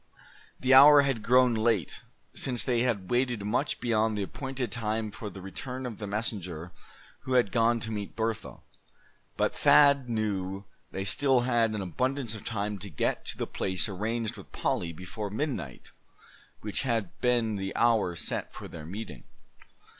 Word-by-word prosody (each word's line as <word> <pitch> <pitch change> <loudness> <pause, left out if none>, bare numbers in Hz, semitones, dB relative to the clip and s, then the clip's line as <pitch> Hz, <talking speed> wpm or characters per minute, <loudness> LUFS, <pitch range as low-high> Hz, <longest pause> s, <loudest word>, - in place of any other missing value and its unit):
The 130 +1 +3
hour 145 +2 +9
had 135 -5 -1
grown 125 +1 +4
late, 110 -7 0 0.3
since 125 -5 0
they 120 +1 +1
had 115 -7 -1
waited 120 -3 +1
much 125 +7 0
beyond 110 -2 +1
the 100 - -1
appointed 130 +2 -4
time 110 -2 -2
for 105 +1 -7
the 95 -1 -10
return 125 +7 -6
of 115 -4 -6
the 105 - -5
messenger 95 -6 -4 0.5
who 130 - -4
had 125 -5 +3
gone 115 0 +3
to 110 - -5
meet 105 -2 -5
Bertha. 110 -1 -3 0.8
But - - +1
Thad 140 -3 +5
knew 100 -3 -2 0.2
they 95 0 -4
still 130 +5 +3
had 120 -3 +1
an 105 - -3
abundance 125 - -1
of 105 - -8
time 105 -2 -3
to 100 +1 -6
get - - -1
to - - -3
the - - -2
place 95 +2 -1
arranged 110 +3 -3
with 100 - -13
Polly, 85 - -1
before 90 +5 -6
midnight, 105 - -4 0.7
which 105 -1 -1
had 115 -8 -1
been 120 -3 +2
the 95 0 -4
hour 115 -7 +2
set - - -4
for - - -9
their 80 -2 -9
meeting. 95 - -7
110 Hz, 165 wpm, -28 LUFS, 100-125 Hz, 0.8 s, hour